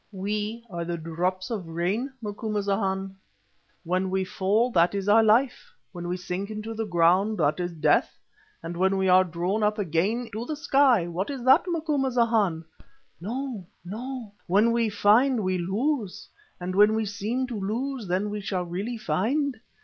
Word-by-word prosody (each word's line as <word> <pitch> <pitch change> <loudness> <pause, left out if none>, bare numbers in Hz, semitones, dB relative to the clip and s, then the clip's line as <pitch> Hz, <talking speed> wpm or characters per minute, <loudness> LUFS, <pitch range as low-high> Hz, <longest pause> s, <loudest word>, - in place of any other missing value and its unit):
We 210 +4 -3
are 170 -5 -5
the 170 0 -3
drops 180 +5 -3
of 200 -7 -4
rain, 185 +11 -2
Macumazahn. 200 -2 -2 0.7
When 185 +2 0
we 190 0 0
fall 200 +6 +1
that 175 -1 +3
is 200 0 -3
our 215 +2 +6
life. 230 +4 +2 0.2
When 175 -2 -6
we 180 +1 -2
sink 180 +2 -4
into 215 +1 -5
the 225 0 -3
ground 185 +4 +3
that 150 +4 +1
is 175 0 -2
death, 160 -3 +1 0.5
and 170 +1 -5
when 190 +2 +2
we 190 0 +1
are 185 +1 +7
drawn 180 +4 -2
up 210 +1 +1
again 205 +6 0
to 220 +2 -3
the 310 - -2
sky, 275 - +3
what 175 +3 -3
is 270 -4 -5
that, 260 +6 +5
Macumazahn? 245 - +1 0.5
No! 230 0 -5 0.2
no! 235 +3 -6 0.2
when 205 +6 +4
we 230 -1 +1
find 220 +4 +3
we 185 -1 0
lose, 210 - -2 0.3
and 180 +1 -4
when 210 +3 +5
we 220 0 0
seem 215 +6 -2
to 240 -4 -5
lose, 235 +4 -3
then 190 +4 -1
we 210 0 -4
shall 190 -2 -2
really 195 +8 -4
find. 230 - -1
205 Hz, 165 wpm, -26 LUFS, 185-230 Hz, 0.7 s, are